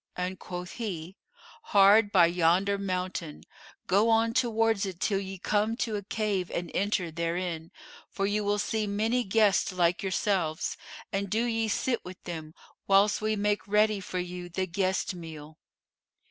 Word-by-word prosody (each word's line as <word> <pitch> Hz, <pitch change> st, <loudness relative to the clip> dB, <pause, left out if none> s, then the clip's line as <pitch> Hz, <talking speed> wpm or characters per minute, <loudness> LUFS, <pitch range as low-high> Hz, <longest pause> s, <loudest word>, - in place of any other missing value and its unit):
And 180 Hz, +1 st, -3 dB
quoth 180 Hz, 0 st, -6 dB
he, 190 Hz, -6 st, -5 dB, 0.5 s
'Hard 205 Hz, -, +5 dB
by 180 Hz, -4 st, +6 dB
yonder 180 Hz, +4 st, +2 dB
mountain; 180 Hz, -4 st, -4 dB, 0.4 s
go 205 Hz, +5 st, +3 dB
on 225 Hz, 0 st, +3 dB
towards 225 Hz, -4 st, +2 dB
it 190 Hz, -3 st, -4 dB
till 195 Hz, 0 st, +1 dB
ye 195 Hz, 0 st, -6 dB
come 210 Hz, +4 st, 0 dB
to 225 Hz, -4 st, -1 dB
a 205 Hz, -, -2 dB
cave 200 Hz, -3 st, -2 dB
and 170 Hz, -1 st, -4 dB
enter 190 Hz, -4 st, 0 dB
therein, 170 Hz, 0 st, -3 dB, 0.4 s
for 195 Hz, -, -2 dB
you 205 Hz, +1 st, 0 dB
will 205 Hz, 0 st, +1 dB
see 215 Hz, +1 st, -1 dB
many 220 Hz, +5 st, +1 dB
guests 205 Hz, -1 st, +3 dB
like 175 Hz, -1 st, +1 dB
yourselves; 190 Hz, -4 st, -1 dB, 0.4 s
and 195 Hz, 0 st, -1 dB
do 220 Hz, +4 st, +1 dB
ye 225 Hz, -2 st, 0 dB
sit 235 Hz, +3 st, -1 dB
with 180 Hz, 0 st, -9 dB
them, 160 Hz, -2 st, -7 dB, 0.3 s
whilst 200 Hz, +2 st, +4 dB
we 215 Hz, 0 st, 0 dB
make 205 Hz, +1 st, 0 dB
ready 210 Hz, 0 st, +3 dB
for 185 Hz, -1 st, -5 dB
you 180 Hz, 0 st, -5 dB
the 185 Hz, +2 st, -2 dB
guest 185 Hz, +1 st, -1 dB
meal. 160 Hz, -3 st, -10 dB
195 Hz, 160 wpm, -28 LUFS, 180-210 Hz, 0.5 s, by